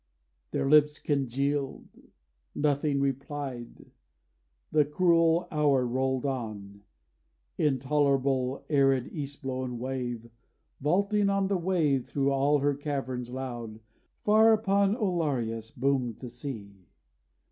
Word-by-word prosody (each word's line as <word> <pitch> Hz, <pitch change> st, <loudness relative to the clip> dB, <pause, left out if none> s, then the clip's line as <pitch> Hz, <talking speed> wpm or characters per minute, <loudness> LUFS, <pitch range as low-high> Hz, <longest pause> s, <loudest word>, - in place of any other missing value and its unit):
Their -, -, -1 dB
lips 150 Hz, 0 st, +5 dB
congealed 140 Hz, 0 st, -1 dB, 0.7 s
Nothing 145 Hz, -1 st, +1 dB
replied. 135 Hz, -2 st, -4 dB, 0.8 s
The 155 Hz, -1 st, +4 dB
cruel 165 Hz, +2 st, +3 dB
hour 145 Hz, -4 st, +2 dB
rolled 130 Hz, +2 st, -1 dB
on. 105 Hz, -7 st, -5 dB, 0.8 s
Intolerable 135 Hz, -2 st, +1 dB
arid 135 Hz, -4 st, +2 dB
east 145 Hz, -2 st, -6 dB
blown 130 Hz, -2 st, -3 dB
wave 120 Hz, -2 st, -4 dB, 0.5 s
Vaulting 200 Hz, +7 st, +2 dB
on 195 Hz, -1 st, +1 dB
wave 170 Hz, -8 st, +1 dB
thro' 140 Hz, -1 st, 0 dB
all 140 Hz, +2 st, +3 dB
her 145 Hz, 0 st, +1 dB
caverns 135 Hz, -4 st, -4 dB
loud, 120 Hz, -4 st, -6 dB, 0.4 s
Far 220 Hz, +1 st, +5 dB
upon 200 Hz, -1 st, +2 dB
Oliaros 140 Hz, -, -1 dB
boomed 130 Hz, -3 st, -1 dB
the 125 Hz, -, -8 dB
sea. 105 Hz, -, -8 dB
140 Hz, 100 wpm, -28 LUFS, 125-150 Hz, 0.8 s, lips